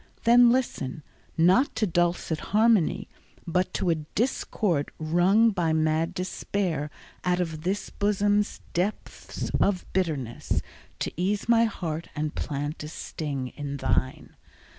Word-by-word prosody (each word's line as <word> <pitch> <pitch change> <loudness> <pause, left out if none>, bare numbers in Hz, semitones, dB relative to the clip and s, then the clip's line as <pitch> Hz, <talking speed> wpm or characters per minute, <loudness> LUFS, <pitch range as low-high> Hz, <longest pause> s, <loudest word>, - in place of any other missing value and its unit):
Then 240 +1 +7
listen, 200 - -1 0.3
not 185 - +4
to 220 -1 +1
dulcet 175 -3 0 0.2
harmony, 220 -6 +3 0.4
But 180 +2 0
to 180 - +1
a 160 -2 -1 0.2
discord 205 - 0
wrung 180 +8 +4
by 170 -5 0
mad 155 +1 +1
despair 180 -4 -2 0.3
Out 180 0 +1
of 160 -3 -2
this 190 +5 -2
bosom's 205 0 +1
depths 190 +4 -3
of 195 -3 +1
bitterness, 150 -11 -1 0.4
To - - -1
ease 200 +4 0
my 230 0 +5
heart 170 -6 -4
and 155 0 -2
plant 145 +1 -3
a 150 - -5
sting 140 -4 -4
in 140 +2 -5
thine. 130 -1 -1
175 Hz, 125 wpm, -26 LUFS, 155-205 Hz, 0.4 s, Then